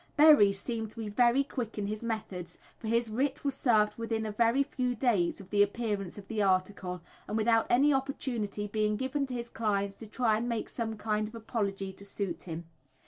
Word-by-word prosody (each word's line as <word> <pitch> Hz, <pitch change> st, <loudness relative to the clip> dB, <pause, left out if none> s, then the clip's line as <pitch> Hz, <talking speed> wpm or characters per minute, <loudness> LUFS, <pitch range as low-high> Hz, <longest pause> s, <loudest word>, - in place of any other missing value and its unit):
Berry 295 Hz, -10 st, +8 dB
seemed 220 Hz, +2 st, -3 dB
to 230 Hz, -, -11 dB
be 220 Hz, -2 st, -3 dB
very 240 Hz, +5 st, +4 dB
quick 240 Hz, -5 st, -5 dB
in 205 Hz, -, -1 dB
his 210 Hz, +1 st, -3 dB
methods, 215 Hz, -6 st, -4 dB, 0.2 s
for 225 Hz, -, -6 dB
his 230 Hz, +1 st, +2 dB
writ 265 Hz, +6 st, -1 dB
was 280 Hz, -, +1 dB
served 215 Hz, -5 st, +2 dB
within 225 Hz, -1 st, -1 dB
a 215 Hz, -, -2 dB
very 235 Hz, +5 st, +3 dB
few 255 Hz, -3 st, -2 dB
days 215 Hz, -8 st, +1 dB
of 190 Hz, -, -12 dB
the 205 Hz, -1 st, +4 dB
appearance 205 Hz, -3 st, -1 dB
of 200 Hz, -1 st, -10 dB
the 220 Hz, -1 st, -1 dB
article, 185 Hz, -2 st, 0 dB, 0.3 s
and 215 Hz, -, -1 dB
without 225 Hz, 0 st, +3 dB
any 280 Hz, +4 st, +5 dB
opportunity 250 Hz, -6 st, -2 dB
being 210 Hz, 0 st, 0 dB
given 265 Hz, +3 st, -1 dB
to 255 Hz, -, -4 dB
his 235 Hz, -1 st, -4 dB
clients 200 Hz, -4 st, -1 dB
to 225 Hz, -, -9 dB
try 220 Hz, -1 st, +1 dB
and 240 Hz, +2 st, -2 dB
make 230 Hz, -2 st, -2 dB
some 225 Hz, -2 st, -3 dB
kind 215 Hz, 0 st, -1 dB
of 220 Hz, -, -11 dB
apology 200 Hz, -4 st, -3 dB
to 195 Hz, -, -11 dB
suit 200 Hz, -1 st, -4 dB
him. 165 Hz, +1 st, -5 dB
220 Hz, 205 wpm, -30 LUFS, 205-240 Hz, 0.3 s, Berry